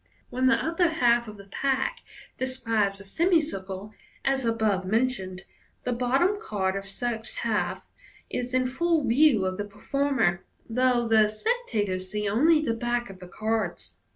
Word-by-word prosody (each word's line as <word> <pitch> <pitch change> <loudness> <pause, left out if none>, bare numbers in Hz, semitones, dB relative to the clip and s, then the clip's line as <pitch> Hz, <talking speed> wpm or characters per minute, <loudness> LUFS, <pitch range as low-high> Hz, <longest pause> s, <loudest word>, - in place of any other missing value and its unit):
When 255 +1 +1
the 265 - +5
upper 335 +2 +1
half 240 -7 +2
of 210 -1 -9
the 200 - -12
pack 270 - -1 0.4
describes 230 -6 -1
a 200 - -11
semicircle, 210 - 0 0.3
as 270 -2 +1
above 220 -4 +1
mentioned, 190 -3 -1 0.4
the 250 - -1
bottom 270 +12 +2
card 190 - -1
of 195 0 -5
such 230 +2 -3
half - - -1 0.4
is 250 +1 -3
in 255 0 +2
full 320 +4 +1
view 240 -5 +4
of 185 0 -2
the 205 - -3
performer, 220 -3 0 0.2
though 245 0 +2
the 220 -1 +5
spectators 215 - -1
see 210 0 -2
only 305 +10 +4
the 265 -7 0
back? 240 -1 -2
of 190 - -13
the 180 - -10
cards. 220 +4 -3
235 Hz, 155 wpm, -27 LUFS, 205-265 Hz, 0.4 s, the